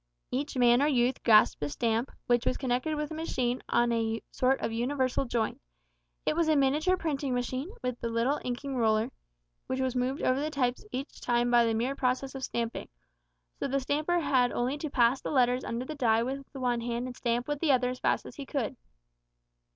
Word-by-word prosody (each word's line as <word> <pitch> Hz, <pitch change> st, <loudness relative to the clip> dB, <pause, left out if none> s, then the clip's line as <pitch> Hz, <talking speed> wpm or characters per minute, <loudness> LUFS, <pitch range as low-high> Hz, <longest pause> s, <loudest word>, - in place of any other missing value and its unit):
Each 275 Hz, +2 st, -2 dB
man 245 Hz, 0 st, +5 dB
or 290 Hz, -, +4 dB
youth 255 Hz, -2 st, +2 dB
grasped 215 Hz, -8 st, +5 dB
a 145 Hz, -, -1 dB
stamp, 230 Hz, -, 0 dB, 0.2 s
which 240 Hz, -1 st, +2 dB
was -, -, +1 dB
connected 255 Hz, +4 st, -1 dB
with 300 Hz, +1 st, -3 dB
a -, -, -3 dB
machine 255 Hz, -6 st, -1 dB
on 240 Hz, 0 st, +3 dB
a 225 Hz, -1 st, -1 dB
sort 260 Hz, +1 st, +2 dB
of -, -, -2 dB
universal 255 Hz, +3 st, 0 dB
joint. 235 Hz, -3 st, -2 dB, 0.6 s
It -, -, +1 dB
was 335 Hz, -1 st, +2 dB
a 310 Hz, -, +4 dB
miniature 295 Hz, +7 st, +2 dB
printing 285 Hz, -6 st, -2 dB
machine, 255 Hz, +5 st, -2 dB
with 250 Hz, -1 st, -3 dB
a -, -, +1 dB
little 235 Hz, +5 st, +1 dB
inking 255 Hz, +2 st, -3 dB
roller, 220 Hz, +1 st, +2 dB, 0.6 s
which 260 Hz, -, -2 dB
was 260 Hz, -1 st, 0 dB
moved 255 Hz, +3 st, -1 dB
over 255 Hz, +1 st, +2 dB
the 300 Hz, +2 st, -1 dB
types 255 Hz, -4 st, -1 dB
each 270 Hz, +3 st, -6 dB
time 240 Hz, 0 st, +1 dB
by 240 Hz, -1 st, +5 dB
the 225 Hz, -1 st, +1 dB
mere 245 Hz, +5 st, 0 dB
process 260 Hz, +1 st, -1 dB
of 265 Hz, -1 st, -6 dB
stamping, 235 Hz, -2 st, -3 dB, 0.7 s
so -, -, -1 dB
the 275 Hz, +1 st, 0 dB
stamper 305 Hz, +6 st, 0 dB
had 260 Hz, -4 st, +2 dB
only 250 Hz, +3 st, -1 dB
to 310 Hz, -, -3 dB
pass 250 Hz, -1 st, +3 dB
the -, -, -4 dB
letters 250 Hz, -2 st, +2 dB
under 235 Hz, +2 st, -3 dB
the 310 Hz, -, -5 dB
die 230 Hz, -5 st, +2 dB
with 270 Hz, +2 st, -5 dB
the 270 Hz, -, -8 dB
one 245 Hz, -2 st, 0 dB
hand 235 Hz, +1 st, -2 dB
and 250 Hz, -1 st, -6 dB
stamp 240 Hz, +1 st, -1 dB
with 295 Hz, -1 st, -2 dB
the 315 Hz, -2 st, +3 dB
other 250 Hz, -1 st, +3 dB
as 255 Hz, -, -7 dB
fast -, -, +1 dB
as -, -, -11 dB
he 285 Hz, -, -5 dB
could. 260 Hz, -3 st, -2 dB
255 Hz, 215 wpm, -29 LUFS, 240-275 Hz, 0.7 s, man